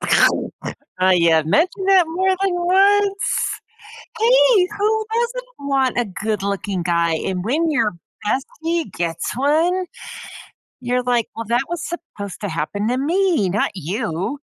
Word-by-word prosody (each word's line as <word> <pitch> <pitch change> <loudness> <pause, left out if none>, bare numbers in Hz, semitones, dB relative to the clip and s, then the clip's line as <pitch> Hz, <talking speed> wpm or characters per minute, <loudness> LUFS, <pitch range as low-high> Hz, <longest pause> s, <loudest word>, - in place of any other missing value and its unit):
I 185 -1 +1
have 160 -1 +3
mentioned 370 - +1
that 380 -3 +6
more 375 +4 0
than 390 - +2
once. 390 +3 +2 0.6
Hey, 485 -5 +5
who 435 +1 +1
doesn't 480 -7 -3
want 265 -3 +1
a 240 - +2
good 210 +1 -3
looking 200 -2 -2
guy? 170 -1 +1
And 180 +2 -3
when 315 +9 +1
your 270 -8 +1 0.3
bestie 320 - -2
gets 170 -2 -3
one, 325 +7 +2 1.0
you're 250 0 0
like, 245 -2 +1
"Well, 230 - -5
that 240 +2 +2
was 345 -2 -4
supposed 205 - -7
to 205 - -2
happen 170 +6 -2
to 250 - 0
me, 330 - +1
not 205 +4 0
you." 185 - -3
270 Hz, 135 wpm, -20 LUFS, -, 1.0 s, that